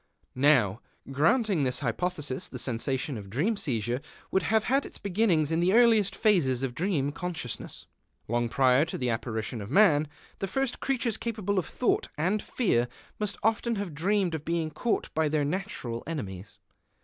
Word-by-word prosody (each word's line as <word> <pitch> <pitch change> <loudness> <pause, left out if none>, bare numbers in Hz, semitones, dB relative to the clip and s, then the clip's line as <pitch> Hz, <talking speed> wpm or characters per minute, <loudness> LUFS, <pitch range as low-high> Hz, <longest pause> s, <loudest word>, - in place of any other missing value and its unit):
Now, 125 -7 +3 0.3
granting 185 - +2
this 125 -2 0
hypothesis, 145 +2 -2
the - - -8
sensation 130 +1 -1
of 100 -1 -10
dream 160 - 0
seizure 120 - -1 0.3
would 190 - +3
have 220 +2 +2
had 270 +5 +2
its - - -8
beginnings 180 -6 +1
in 165 - +1
the 180 +3 +3
earliest 220 -5 +5
phases 145 - +2
of 130 -2 -2
dream 155 -3 0
consciousness, 160 -6 -4 0.4
long 120 +1 0
prior 130 +2 +4
to - - -5
the 125 -2 0
apparition 115 0 -3
of 100 - -7
man. 155 -3 +5 0.3
The 195 - -2
first 270 +5 -1
creatures 245 -5 0
capable 205 -4 -1
of 180 - -4
thought 250 - 0
and 185 +7 +1
fear 125 - +1 0.3
must 210 -1 -1
often 225 +1 +1
have 200 -5 -4
dreamed 185 +3 +1
of 155 -2 -3
being 165 -1 -1
caught 220 +10 -1
by 160 -1 +1
their 150 -1 +1
natural 150 - -3
enemies. 100 - -6
160 Hz, 165 wpm, -28 LUFS, 130-205 Hz, 0.4 s, earliest